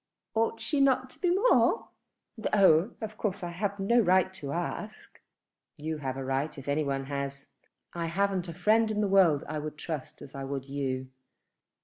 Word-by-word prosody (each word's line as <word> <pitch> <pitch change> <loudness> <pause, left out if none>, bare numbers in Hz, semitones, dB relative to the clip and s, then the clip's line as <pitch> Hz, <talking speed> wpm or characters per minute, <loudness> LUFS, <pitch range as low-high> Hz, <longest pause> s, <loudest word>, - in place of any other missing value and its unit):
"Ought 225 0 +1
she 290 -2 0
not 260 -1 +3
to - - -14
be 360 - +1
more? 400 +8 +3 0.5
Though 200 -3 +3
of 215 -1 -6
course 200 -3 -2
I 175 - -3
have 200 +3 -3
no 235 +5 +3
right 185 -2 +3
to 145 -7 -6
ask." 175 +6 -5 0.6
"You 155 +1 -3
have 135 -2 -3
a 135 - -4
right 135 +4 -1
if 135 - -9
any 145 +2 +1
one 135 -1 -2
has. 140 0 -4 0.5
I 170 -1 -2
haven't 190 +1 0
a - - -5
friend 215 +5 +3
in 210 -1 0
the 205 - +2
world 185 -7 +4
I 155 0 -3
would 150 0 -6
trust 150 -3 -6
as 140 - -12
I 135 -1 -5
would 135 0 -4
you. 135 -2 -3
170 Hz, 190 wpm, -29 LUFS, 140-210 Hz, 0.6 s, world